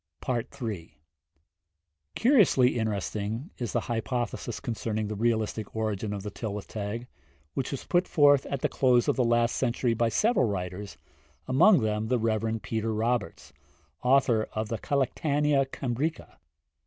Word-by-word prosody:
III. 115 - -4 1.2
Curiously 195 - +4
interesting 110 - -3
is 120 -3 -3
the - - 0
hypothesis 120 0 -3
concerning 110 -2 -3
the 105 - -4
realistic 110 -1 -1
origin 110 -2 -2
of 100 -1 -4
the 105 - -5
Tylwyth 105 -1 -5
Teg, 110 +3 -5 0.5
which 135 - -2
was 140 - -5
put 175 +1 +2
forth 145 -3 +4
at 140 -2 -3
the - - +2
close 125 -2 +3
of - - +2
the 130 - +2
last 120 0 +2
century 120 -1 0
by 115 0 +1
several 215 - +2
writers, 95 0 -4 0.5
among 140 - +5
them 110 0 -1
the 125 +2 +2
Rev. 110 0 -1
Peter 110 0 -2
Roberts, 105 - -2 0.5
author 125 -4 +3
of 110 0 -3
the 115 - -3
'Collectanea 140 +1 +1
Cambrica.' 135 +5 -3
115 Hz, 140 wpm, -28 LUFS, 110-130 Hz, 1.2 s, among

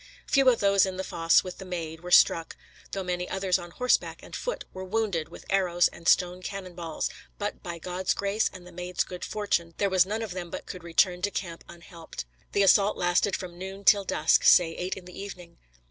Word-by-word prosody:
Few 275 -2 +4
of 240 - +2
those 200 -1 +4
in 185 -1 -5
the 190 - -2
fosse 165 -2 +3
with 185 -1 -8
the - - -7
Maid 165 -3 -5
were 175 +2 -8
struck, 165 -2 +4 0.3
though 195 - -3
many 180 0 -3
others 190 -1 +1
on 175 - -9
horse 250 +8 +2
and - - -9
foot - - -4
were 185 - -6
wounded 190 -5 -1
with - - -12
arrows 180 -3 +2
and 170 - -10
stone 180 0 +3
cannon 185 -1 -6
balls, 170 -2 -3 0.3
but 205 0 -4
by 170 -2 -6
God's 180 +2 -2
grace 200 +2 0
and 185 -2 -12
the 180 - -12
Maid's 180 +1 -2
good 180 -1 -8
fortune, 175 -6 -1
there 200 -1 +1
was 185 -1 +4
none 220 +3 -2
of 220 - -5
them 175 -1 -5
but - - -7
could 180 -3 -8
return 175 +1 +2
to 205 - +1
camp 170 -4 -5
unhelped. 170 - -10 0.3
The 200 - +3
assault 200 +1 +4
lasted 175 +3 +2
from 175 -2 -7
noon 190 +1 -7
till 200 0 +6
dusk 160 -4 +2
say 170 -2 +6
eight 180 +3 -4
in 185 - -10
the 180 +1 -11
evening. 180 -4 -10
180 Hz, 220 wpm, -27 LUFS, 175-195 Hz, 0.3 s, till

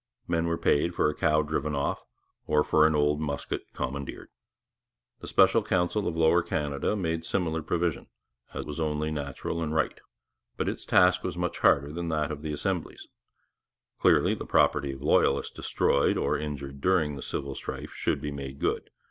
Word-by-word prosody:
Men 85 -1 0
were 85 0 0
paid 85 +4 +1
for 75 - +2
a - - -10
cow 75 -3 +2
driven 75 0 -2
off, 70 0 -1 0.5
or 75 0 +3
for 80 0 +4
an 80 - +1
old 75 0 +2
musket 70 -2 -3
commandeered. 70 +1 -5 0.9
The - - -9
Special - - +5
Council 90 +4 0
of 85 -1 -2
Lower 80 +2 +4
Canada 75 +2 -1
made 85 -4 -2
similar 80 -2 -1
provision, 80 -2 -1 0.4
as - - -5
was 75 +1 -6
only 75 0 -1
natural 75 +2 -4
and 80 -1 -2
right; 75 - 0 0.6
but - - -1
its - - -3
task 90 0 +4
was - - -3
much 90 -1 -2
harder 70 +1 +3
than 85 0 -3
that 75 -1 0
of 75 -1 -6
the 80 0 -4
Assembly's. 75 - -3 0.9
Clearly, - - +4
the - - -5
property 70 -2 +2
of 65 0 -10
loyalists 70 -1 +2
destroyed 70 - +1
or 70 +1 +1
injured 70 -2 -5
during 80 -5 +2
the 70 - -7
civil 70 +1 -4
strife - - -6
should - - -1
be 75 -1 -3
made 70 -1 -6
good. - - -1
75 Hz, 175 wpm, -28 LUFS, 70-80 Hz, 0.9 s, Special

